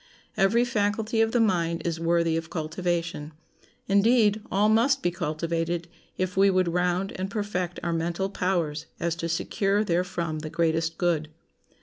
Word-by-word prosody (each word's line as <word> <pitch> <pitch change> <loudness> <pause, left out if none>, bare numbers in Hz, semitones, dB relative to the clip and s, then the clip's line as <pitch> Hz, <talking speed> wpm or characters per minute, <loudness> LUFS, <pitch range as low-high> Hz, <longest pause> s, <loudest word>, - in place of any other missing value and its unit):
Every 230 +5 +3
faculty 220 -1 0
of 225 0 +2
the 240 - +2
mind 170 -6 +1
is 165 -1 -1
worthy 165 -1 +2
of 165 0 -3
cultivation; 165 -1 -3 0.5
indeed, 210 +1 +4
all 205 +2 +3
must 245 +5 +3
be 175 - +2
cultivated, 165 +1 -2 0.3
if 185 0 -2
we 195 +1 +5
would 185 -2 +2
round 180 +2 0
and 190 +1 -3
perfect 195 -4 -3
our 170 0 -1
mental 170 +3 -1
powers 170 -6 -1
as 170 -1 -1
to 170 0 -3
secure 195 +5 0
therefrom 170 -4 -1
the 155 0 -6
greatest 165 0 0
good. 165 -4 0
175 Hz, 150 wpm, -26 LUFS, 165-200 Hz, 0.5 s, we